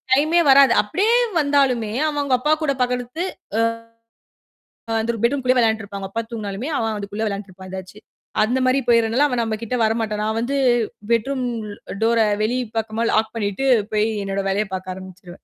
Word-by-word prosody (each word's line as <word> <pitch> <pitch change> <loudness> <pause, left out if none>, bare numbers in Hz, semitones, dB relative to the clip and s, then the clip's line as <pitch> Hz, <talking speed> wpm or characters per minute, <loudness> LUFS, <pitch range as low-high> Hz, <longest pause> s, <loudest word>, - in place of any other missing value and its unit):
டைம்மே 310 +5 +3
வராது. 275 -2 +7
அப்பிடியே 400 - +2 0.2
வந்தாலுமே 270 -7 +2 0.2
அவுங்க 285 -3 -1
அப்பாகூடப் 300 -2 0
படுத்து 250 +6 -3 0.4
அ - - +4 1.4
அந்த 230 - -1
ஒரு - - -7
பெட்ரூம்க்குள்ளே 255 0 +2
விளையாடிட்டு 220 -1 +2
இருப்பாங்க. 195 -1 -6
அப்பா 230 +3 -2
தூங்கனாலுமே 215 +4 -4
அவன் 225 -1 -1
அதுக்குள்ள 205 +2 -4
விளையான்டுட்டு 200 -1 -5
இருப்பான் 190 0 -11
எதாச்சு. 190 +2 -8 0.4
அந்தமாரி 255 +3 +2
போயிறனால 230 +4 +3
அவன் 250 -4 -1
நம்மகிட்ட 225 +2 -3
வர 220 0 +3
மாட்டான். 215 -2 -2
நான் 220 +1 -1
வந்து 245 +5 -2 0.6
பெட்ரூம் 250 +3 0 0.6
டோர 230 0 +3 0.2
வெளிப்பக்கமாக 225 -1 -1
லாக் 220 0 +1
பண்ணிட்டு 205 +4 -2 0.3
போய் 215 +1 +2 0.2
என்னோட 195 0 -2
வேலைய 200 +2 0
பாக்க 185 0 -6
ஆரம்பிச்சிருவேன். 185 -1 -12
230 Hz, 150 wpm, -21 LUFS, 210-260 Hz, 1.4 s, வராது